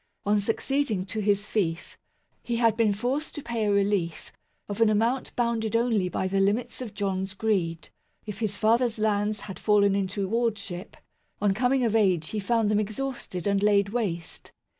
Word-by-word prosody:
On 205 +1 +3
succeeding 225 -1 -1
to 215 +3 -4
his 205 -1 +1
fief, 170 -7 -2 0.5
he 235 - -2
had 230 -2 +3
been 225 -2 +3
forced 250 +9 -2
to 295 - -6
pay 230 -2 -2
a - - +2
relief 200 -4 0 0.4
of 205 +2 -4
an 225 - +6
amount 230 +5 +1
bounded 230 -2 0
only 225 -6 +2
by 190 - -1
the 195 +1 0
limits 225 +6 0
of 225 -5 -7
John's 195 -1 -2
greed. 185 -6 -1 0.4
If 210 -2 -6
his 210 -3 -1
father's 230 +1 +2
lands 210 0 0
had 195 - -8
fallen 205 -2 +3
into 195 0 -1
wardship, 210 -4 -2 0.4
on 205 -2 +2
coming 250 +4 +2
of 225 -2 +1
age 185 -7 +2
he 215 - -2
found 220 +1 +1
them 210 - +3
exhausted 215 -4 -4
and 200 -1 +2
laid 200 -1 +3
waste. 195 -7 -4
210 Hz, 175 wpm, -26 LUFS, 195-230 Hz, 0.5 s, an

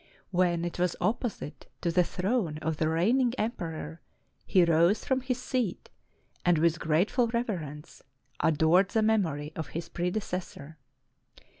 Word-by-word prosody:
When 175 -2 +2
it 175 - -5
was 180 -1 +1
opposite 220 - -3
to 170 - 0
the 180 +1 +4
throne 180 -3 -1
of 160 -1 -1
the 155 0 +1
reigning 235 +10 +2
emperor, 165 -7 -4 0.5
he 185 -3 +5
rose 170 +4 +3
from 260 -1 +1
his 255 -1 -2
seat, 250 -6 -2 0.5
and 175 -2 +4
with 165 +1 +2
grateful 185 - +2
reverence, 180 - -4 0.4
adored 160 +5 +4
the 220 +1 +1
memory 160 -9 0
of 160 -3 -4
his 170 0 -5
predecessor. 175 -4 -4
175 Hz, 135 wpm, -29 LUFS, 160-220 Hz, 0.5 s, he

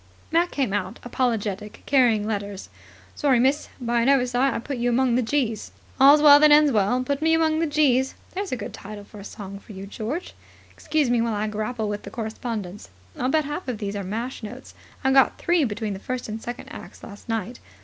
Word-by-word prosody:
Mac 340 +2 +3
came 265 - -1
out, 190 -2 -2
apologetic, 215 -5 -2
carrying 240 -6 +3
letters. 205 -2 -4 0.4
"Sorry, 270 -4 +2
miss. 270 +4 +1
By 240 -1 0
an 240 - +2
oversight 255 0 +3
I - - -2
put 270 +3 -5
you 240 +1 +1
among 245 0 +2
the 250 - +3
G's." 230 -3 -1 0.3
"All's 285 +3 +7
well 290 -1 +9
that 305 0 +6
ends 295 0 +6
well. 220 +3 +2
'Put 280 +2 -2
me 320 +1 +3
among 320 -1 +2
the 330 - +1
G's.' 270 -3 +2 0.2
There's 390 +1 -4
a - - 0
good 230 - -7
title 205 0 -9
for 205 +1 -13
a - - -9
song 200 -1 -8
for 210 - -13
you, 190 0 -8
George. 230 - -5 0.4
Excuse 305 -5 0
me 240 -1 +3
while 230 -2 0
I 210 +1 -1
grapple 215 +1 -3
with 205 0 -3
the - - -9
correspondence. 220 - -5 0.3
I'll 255 - -1
bet 310 +1 +2
half 295 +4 -5
of 250 -3 -2
these 205 -1 -4
are 200 - -3
mash 230 +8 -4
notes. 245 +4 -9 0.3
I 265 - +3
got 270 -1 +4
three 340 -4 +2
between 210 -2 -3
the 190 - -7
first 255 +3 -4
and 220 +1 -5
second 240 +1 -7
acts - - -11
last 205 +2 -12
night. 225 +1 -3
240 Hz, 215 wpm, -24 LUFS, 210-275 Hz, 0.4 s, well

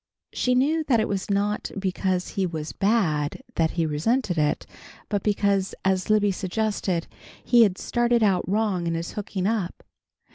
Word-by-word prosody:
She 250 0 +1
knew 305 +5 +2
that 240 -6 +3
it 220 - +1
was 195 -1 -3
not 205 +1 0
because 185 -1 -1
he 190 -2 -1
was 155 -3 -5
bad 195 - 0
that 165 -6 +2
he 165 - +2
resented 180 - 0
it, 150 -2 0 0.4
but 205 -2 0
because, 200 -2 +1
as 190 0 +1
Libby 210 -1 +4
suggested, 190 -2 -1 0.4
he 240 -1 +5
had 200 -5 +4
"started 240 -1 +1
out 190 -4 +2
wrong 200 -4 0
in 165 - 0
his 165 +1 -4
hooking 195 -2 -4
up." 205 -4 -2
195 Hz, 160 wpm, -25 LUFS, 180-220 Hz, 0.4 s, he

